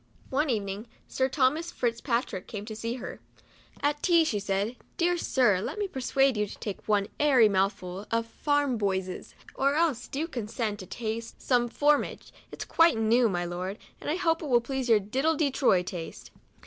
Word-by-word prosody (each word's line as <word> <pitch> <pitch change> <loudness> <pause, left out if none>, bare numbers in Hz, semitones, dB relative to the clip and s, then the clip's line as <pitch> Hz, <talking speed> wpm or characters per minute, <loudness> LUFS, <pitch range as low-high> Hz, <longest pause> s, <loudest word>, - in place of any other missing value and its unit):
One 290 +3 +1
evening 205 -1 -2 0.2
Sir 260 0 0
Thomas 300 +5 +1
Fitz 235 -1 -1
Patrick 235 -7 -2
came 210 -2 -6
to 220 -1 -6
see 230 +2 -3
her. 255 - -7 0.6
At 295 0 +1
tea, 340 -2 +5
she 215 -9 0
said, 200 +3 -1
" - - -37
Dear 350 +1 +2
Sir, 245 - +2
let 220 - -4
me 410 -1 -1
persuade 270 -3 +1
you 210 0 0
to - - -10
take 205 -3 -6
one 205 -2 +3
airy 265 -7 +6
mouthful 195 -1 -1
of 230 0 0
\fram 285 0 0
boysesj 190 -2 -2 0.2
or 275 +1 +1
else 300 -7 +1
do 300 +4 -3
condescend 225 -6 -3
to 185 - -8
taste 225 +2 -5
some 245 -2 +2
4 290 +5 +3
fr - - +6
omnia - - -4
ge - - -19 0.2
it - - -9
is - - -12
quite 330 -6 +4
new, 225 +2 +3
my 175 -2 -1
Lord, 180 +3 -4 0.2
and - - -5
I 305 - +1
hope 330 -2 +1
it 310 - -4
will 240 -2 +5
please 260 +1 -3
your 225 - +7
c 200 - -5
diddle 270 +9 +1
de 285 -3 +2
toryj 190 -10 +3
taste." 170 -3 -7
235 Hz, 210 wpm, -28 LUFS, 205-285 Hz, 0.6 s, your